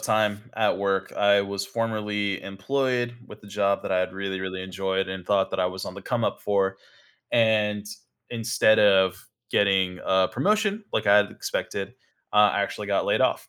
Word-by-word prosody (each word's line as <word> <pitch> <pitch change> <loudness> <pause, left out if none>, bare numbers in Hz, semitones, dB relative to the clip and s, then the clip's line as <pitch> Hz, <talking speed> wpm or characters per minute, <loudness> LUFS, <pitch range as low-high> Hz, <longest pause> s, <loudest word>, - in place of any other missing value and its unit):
time 105 -1 0
at 110 -4 +1
work. 95 -1 -1
I 100 0 +4
was 100 0 -3
formerly 105 -3 -2
employed 120 +4 -2
with 105 - -13
the 105 - -15
job 100 0 0
that - - -5
I 95 - +2
had 90 0 -1
really, 95 0 -4
really 95 0 -5
enjoyed, 95 0 -2
and 95 -1 -6
thought 100 -2 +2
that 95 - -3
I 90 - +2
was 95 +1 -5
on 90 - -7
the 100 - -10
come-up 120 +1 -1
for 95 -1 0 0.6
and 105 -3 +2 0.5
instead 115 -2 +2
of 95 -2 +4 0.3
getting 95 -2 +2
a 95 0 +3
promotion 215 +1 0
like - - -1
I 100 - +7
had 105 0 +3
expected, 95 -1 -4 0.4
uh, 105 -1 +6
I - - +1
actually 105 +1 -4
got 100 -1 +1
laid - - +1
off, - - +1
100 Hz, 180 wpm, -25 LUFS, 95-110 Hz, 0.6 s, I